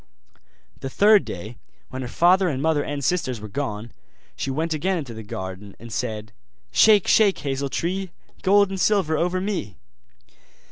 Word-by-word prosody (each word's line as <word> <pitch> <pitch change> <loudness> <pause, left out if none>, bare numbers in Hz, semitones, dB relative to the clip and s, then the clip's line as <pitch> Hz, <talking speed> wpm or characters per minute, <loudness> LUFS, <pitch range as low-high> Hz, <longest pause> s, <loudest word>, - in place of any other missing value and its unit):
The 135 - -5
third 205 +7 +5
day, 105 +6 -7 0.3
when 130 0 -5
her 125 - -4
father 180 +7 +3
and 135 -4 -2
mother 155 0 +1
and 145 -1 -4
sisters 130 -8 0
were 105 - -8
gone, 110 -2 -4 0.4
she - - -3
went 160 +4 -1
again 180 +5 0
into 140 -8 -6
the 110 - -8
garden, 95 -1 -7
and 115 0 -9
said: 110 -1 -4 0.4
'Shake, 210 - +5
shake, 205 -3 +4
hazel 140 0 -3
tree, 185 +6 -2 0.3
Gold 200 +1 +4
and 190 -1 -3
silver 190 -7 +2
over 180 +3 0
me! 185 - -3
145 Hz, 160 wpm, -23 LUFS, 115-185 Hz, 0.4 s, third